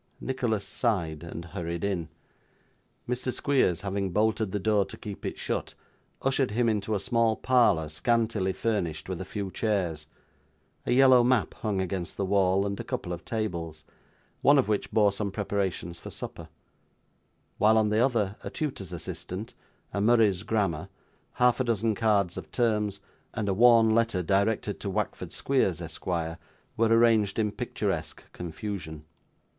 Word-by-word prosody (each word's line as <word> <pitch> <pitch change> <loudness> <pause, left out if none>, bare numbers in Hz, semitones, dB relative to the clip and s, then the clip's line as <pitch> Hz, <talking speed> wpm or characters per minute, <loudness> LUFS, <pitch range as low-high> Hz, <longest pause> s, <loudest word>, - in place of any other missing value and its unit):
Nicholas 120 -6 -1
sighed, 85 - -1
and 85 0 -7
hurried 85 -1 -5
in. 90 -5 -1 1.0
Mr. 125 +1 -1
Squeers, 130 - +1
having 100 -1 -2
bolted 110 +1 +1
the 105 - -1
door 105 0 +2
to - - -9
keep 105 -2 -6
it - - -5
shut, - - -3 0.5
ushered 135 -1 +2
him 115 +3 +1
into 105 -1 0
a - - 0
small 115 +1 +2
parlour 110 -11 +3
scantily 110 +4 0
furnished 90 -8 -2
with 95 -1 -4
a - - -5
few 100 -1 -4
chairs, 90 -9 -1 0.8
a - - +1
yellow 130 -1 +7
map 125 -2 +2
hung 105 -4 -2
against 95 -2 -3
the 100 - 0
wall, 95 0 +2
and 100 0 -3
a - - -3
couple 90 - -4
of 85 - -7
tables; 85 -8 -4 0.6
one 145 +1 +6
of 135 - +3
which 105 -2 0
bore 105 -2 +4
some 100 +1 -2
preparations 95 -4 -2
for - - -9
supper; - - -7 1.1
while, 110 +2 +5
on 110 -1 +3
the 110 +2 +3
other, 110 -6 +1
a - - -4
tutor's 130 - -4
assistant, 90 +4 -6 0.4
a 100 - -1
Murray's 110 -4 +4
grammar, 100 -8 -1 0.4
half 125 0 +3
a - - +3
dozen 115 -2 +1
cards 100 -5 +1
of - - -8
terms, 105 -4 0 0.3
and 110 -2 -2
a 100 - +2
worn 115 +1 +6
letter 115 -5 +2
directed 100 +3 +1
to 100 - -4
Wackford 105 +2 -3
Squeers, 115 -11 +1
Esquire, 85 0 -4 0.4
were 115 +1 +3
arranged 115 -3 +4
in 105 -2 +1
picturesque 105 - -3
confusion. 80 -3 -6
105 Hz, 155 wpm, -28 LUFS, 95-115 Hz, 1.1 s, yellow